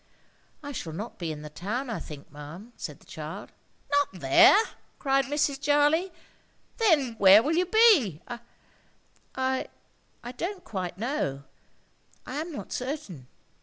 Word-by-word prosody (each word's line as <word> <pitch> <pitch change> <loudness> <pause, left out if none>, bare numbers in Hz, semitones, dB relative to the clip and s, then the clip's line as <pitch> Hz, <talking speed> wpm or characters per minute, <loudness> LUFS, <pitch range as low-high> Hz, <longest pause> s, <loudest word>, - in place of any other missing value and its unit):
"I 285 - -6
shall 165 - -5
not 210 +8 -7
be 170 -3 -3
in 150 -1 -7
the 150 - -7
town, 220 - -3
I 230 - -3
think, 145 -2 -10
ma'am," 160 - -10
said - - -7
the - - -20
child. - - -8 0.4
"Not 285 0 +3
there!" 135 - +7 0.4
cried 270 -1 +2
Mrs. 285 -1 0
Jarley. 295 +6 +3 0.7
"Then 315 - +3
where 200 +2 +8
will 305 - 0
you 360 +1 +2
be?" 370 - +5 1.2
"I—I—don't 260 +5 -5
quite 185 -4 -5
know. 200 - -2 0.8
I 260 - -5
am 325 +3 -4
not 290 - -7
certain." 250 - -5
260 Hz, 130 wpm, -27 LUFS, 180-295 Hz, 1.2 s, where